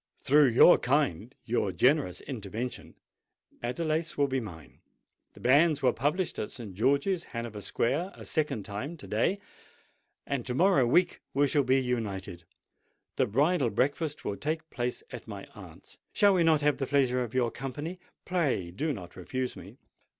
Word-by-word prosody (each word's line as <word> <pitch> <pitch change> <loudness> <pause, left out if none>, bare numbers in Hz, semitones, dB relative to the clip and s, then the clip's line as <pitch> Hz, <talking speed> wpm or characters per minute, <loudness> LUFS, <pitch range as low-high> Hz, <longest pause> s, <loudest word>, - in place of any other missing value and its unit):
Through 145 +1 +5
your 125 +8 +7
kind—your 120 - 0
generous 135 - +2
intervention, 115 -1 -6 0.7
Adelais 155 +6 -2
will 145 - +4
be 135 -1 -1
mine. 80 - -10 0.5
The - - -15
banns 145 +3 +4
were 125 - +4
published 150 +8 -1
at - - -3
St. 110 -6 -8
George's, 140 - +1
Hanover 115 -3 -5
Square, 145 - -1
a - - -11
second 145 -9 -1
time 110 - -5
to 145 - -12
day; 150 - 0 0.9
and 140 -3 -2
to 125 - -2
morrow 170 -6 +4
week 175 +9 +2
we 145 +1 +4
shall 145 +1 +2
be 130 0 +3
united. 100 -9 -3 0.7
The - - +2
bridal 140 - +2
breakfast 145 +7 -1
will 100 - -2
take 160 +1 -3
place 120 0 -3
at - - -8
my - - -7
aunt's: - - -13
shall 205 -2 +5
we 180 - +3
not 160 -2 +4
have 145 0 +2
the 135 - -2
pleasure 130 -3 +2
of 120 -1 -5
your 120 -2 +2
company? 145 +9 -6 0.3
Pray, 140 - 0
do 150 - -2
not 90 -7 -9
refuse 125 +8 -4
me." - - -12
130 Hz, 160 wpm, -29 LUFS, 115-155 Hz, 0.9 s, your